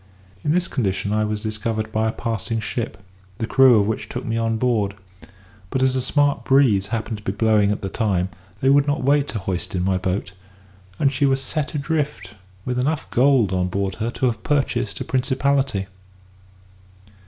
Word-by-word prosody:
In 150 Hz, -, +1 dB
this 180 Hz, +3 st, +1 dB
condition 100 Hz, -4 st, -1 dB
I 110 Hz, 0 st, +1 dB
was 105 Hz, 0 st, -2 dB
discovered 110 Hz, 0 st, -2 dB
by 110 Hz, +1 st, +1 dB
a -, -, +1 dB
passing 115 Hz, 0 st, -3 dB
ship, 110 Hz, -1 st, -4 dB, 0.4 s
the 115 Hz, -, -2 dB
crew 130 Hz, -2 st, +6 dB
of 100 Hz, -, +2 dB
which 110 Hz, +1 st, -3 dB
took -, -, -5 dB
me 115 Hz, -, -2 dB
on 115 Hz, -1 st, 0 dB
board; 110 Hz, -5 st, 0 dB, 0.7 s
but, 130 Hz, +4 st, 0 dB
as 130 Hz, 0 st, +3 dB
a 130 Hz, -, +1 dB
smart 145 Hz, +2 st, +1 dB
breeze 130 Hz, -8 st, +3 dB
happened 110 Hz, 0 st, -3 dB
to -, -, -17 dB
be 95 Hz, -, -1 dB
blowing 105 Hz, -1 st, +3 dB
at 105 Hz, -, -3 dB
the -, -, -1 dB
time, 95 Hz, -4 st, 0 dB, 0.3 s
they 135 Hz, -, +3 dB
would 140 Hz, +1 st, +4 dB
not 145 Hz, 0 st, 0 dB
wait 140 Hz, +1 st, +3 dB
to -, -, -4 dB
hoist 95 Hz, -2 st, -3 dB
in 90 Hz, -, 0 dB
my 95 Hz, 0 st, +1 dB
boat; 95 Hz, 0 st, -2 dB, 0.6 s
and 140 Hz, -1 st, +2 dB
she 140 Hz, +2 st, +2 dB
was 135 Hz, 0 st, +2 dB
set 150 Hz, +3 st, -2 dB
adrift 145 Hz, -, -2 dB, 0.3 s
with 125 Hz, 0 st, -1 dB
enough 145 Hz, +4 st, -1 dB
gold 125 Hz, -6 st, +3 dB
on 90 Hz, -1 st, +1 dB
board 95 Hz, +1 st, -2 dB
her 115 Hz, -, 0 dB
to 125 Hz, -, -2 dB
have 115 Hz, -3 st, 0 dB
purchased 125 Hz, -8 st, -1 dB
a -, -, 0 dB
principality. 130 Hz, -4 st, 0 dB
115 Hz, 190 wpm, -22 LUFS, 100-135 Hz, 0.7 s, crew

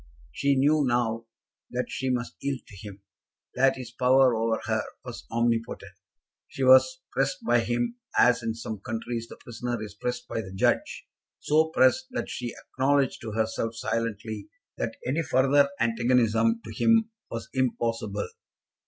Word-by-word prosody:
She 140 Hz, -, +1 dB
knew 145 Hz, +3 st, +3 dB
now 120 Hz, -2 st, 0 dB, 0.4 s
that 125 Hz, +1 st, -2 dB
she 130 Hz, -, -2 dB
must 125 Hz, -1 st, -1 dB
yield 140 Hz, -2 st, -3 dB
to 100 Hz, -, -14 dB
him, 100 Hz, 0 st, -10 dB, 0.5 s
that 135 Hz, +1 st, +3 dB
his 125 Hz, -3 st, -8 dB
power 125 Hz, 0 st, +4 dB
over 115 Hz, 0 st, 0 dB
her 110 Hz, -2 st, +1 dB, 0.2 s
was 125 Hz, -2 st, -8 dB
omnipotent. 115 Hz, 0 st, -1 dB, 0.6 s
She 135 Hz, -, -4 dB
was 130 Hz, -, +6 dB
pressed 135 Hz, +7 st, -1 dB
by 120 Hz, 0 st, +4 dB
him 120 Hz, -, -1 dB, 0.2 s
as 125 Hz, -1 st, +5 dB
in 115 Hz, -1 st, -2 dB
some 110 Hz, -2 st, -6 dB
countries 115 Hz, +2 st, -4 dB
the -, -, -10 dB
prisoner 120 Hz, 0 st, -4 dB
is 105 Hz, -1 st, -7 dB
pressed 125 Hz, +3 st, -4 dB
by 115 Hz, -, -2 dB
the 95 Hz, -2 st, -9 dB
judge, -, -, 0 dB, 0.3 s
so 155 Hz, +2 st, +3 dB
pressed 160 Hz, -, +3 dB
that -, -, -3 dB
she 120 Hz, -1 st, -4 dB
acknowledged 135 Hz, 0 st, 0 dB
to 110 Hz, -2 st, -6 dB
herself 110 Hz, +1 st, -1 dB
silently 110 Hz, -2 st, -3 dB, 0.3 s
that -, -, -3 dB
any 135 Hz, +7 st, 0 dB
further 140 Hz, 0 st, +3 dB
antagonism 115 Hz, -1 st, +2 dB
to 110 Hz, -, -8 dB
him 225 Hz, -, +3 dB, 0.2 s
was 115 Hz, 0 st, -5 dB
impossible. 115 Hz, -5 st, -1 dB
120 Hz, 155 wpm, -27 LUFS, 115-130 Hz, 0.6 s, was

